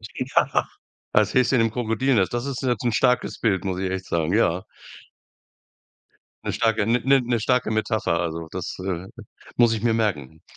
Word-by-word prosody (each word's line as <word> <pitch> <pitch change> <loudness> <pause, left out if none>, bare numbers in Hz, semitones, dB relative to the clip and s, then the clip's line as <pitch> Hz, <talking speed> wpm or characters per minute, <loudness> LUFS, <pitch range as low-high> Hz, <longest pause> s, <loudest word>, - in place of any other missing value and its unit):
Ja. 130 +1 +1 0.5
Als - - +2
Häschen 125 -1 +3
im 115 -1 +2
Krokodil-Nest. 115 -2 +1
Das 120 +3 -2
ist 135 -1 -4
jetzt 125 -1 -1
'n 120 - +1
starkes 125 +2 +1
Bild, 100 -4 +1
muss 95 -2 -2
ich 95 - -1
echt 95 0 -4
sagen. 85 +1 -1
Ja. 95 -5 +2 1.8
'Ne - - -2
starke 110 -2 +1
'ne 125 +4 +3
'ne 120 -1 0
starke 125 0 +1
Metapher, 110 -6 0
also 85 -1 -3
das, 90 -2 -5
äh, 90 -1 -4 0.5
muss 120 -2 +5
ich 110 - -3
mir 115 -1 +3
merken. 80 - -2
110 Hz, 165 wpm, -23 LUFS, 95-120 Hz, 1.8 s, muss